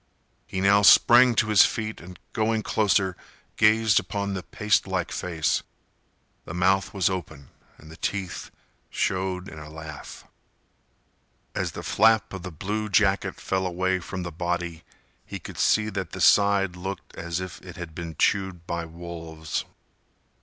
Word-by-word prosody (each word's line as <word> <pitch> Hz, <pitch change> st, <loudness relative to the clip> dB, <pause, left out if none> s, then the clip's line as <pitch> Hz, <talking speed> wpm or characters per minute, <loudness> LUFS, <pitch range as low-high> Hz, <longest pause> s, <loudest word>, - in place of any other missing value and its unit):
He 95 Hz, -, -3 dB
now 100 Hz, +1 st, +5 dB
sprang 120 Hz, +4 st, +7 dB
to 110 Hz, -, +2 dB
his 105 Hz, -2 st, +7 dB
feet 110 Hz, -1 st, -2 dB
and, 90 Hz, +1 st, -11 dB, 0.2 s
going 110 Hz, -1 st, 0 dB
closer, 100 Hz, -4 st, +1 dB, 0.4 s
gazed 110 Hz, 0 st, +4 dB
upon 100 Hz, +1 st, -3 dB
the 95 Hz, -, -3 dB
pastelike 95 Hz, -3 st, 0 dB
face. 80 Hz, -4 st, -1 dB, 0.8 s
The 80 Hz, -, -7 dB
mouth 95 Hz, +2 st, +2 dB
was 95 Hz, -4 st, +1 dB
open 80 Hz, -7 st, -5 dB, 0.3 s
and 80 Hz, -, -14 dB
the 80 Hz, -, -12 dB
teeth 95 Hz, -2 st, -4 dB, 0.4 s
showed 95 Hz, 0 st, -1 dB
in 80 Hz, -, -9 dB
a 75 Hz, 0 st, -10 dB
laugh. 80 Hz, -1 st, -9 dB, 1.3 s
As -, -, -2 dB
the -, -, -7 dB
flap 110 Hz, 0 st, +3 dB
of 95 Hz, -, -6 dB
the 90 Hz, -, -6 dB
blue 105 Hz, +6 st, -3 dB
jacket 100 Hz, -1 st, +2 dB
fell 95 Hz, -1 st, -1 dB
away 95 Hz, +1 st, 0 dB
from 90 Hz, +1 st, -6 dB
the 85 Hz, -, -5 dB
body, 85 Hz, 0 st, -3 dB, 0.4 s
he -, -, -7 dB
could -, -, -10 dB
see 110 Hz, -1 st, +3 dB
that 95 Hz, -2 st, -5 dB
the 95 Hz, -, -6 dB
side 100 Hz, -1 st, +4 dB
looked 95 Hz, +2 st, -7 dB
as 85 Hz, +1 st, -3 dB
if 95 Hz, -1 st, -7 dB
it 90 Hz, -2 st, -11 dB
had 85 Hz, -3 st, -8 dB
been 85 Hz, -1 st, -6 dB
chewed 95 Hz, -4 st, 0 dB
by 85 Hz, -1 st, -3 dB
wolves. 80 Hz, -1 st, -6 dB
95 Hz, 155 wpm, -25 LUFS, 85-100 Hz, 1.3 s, sprang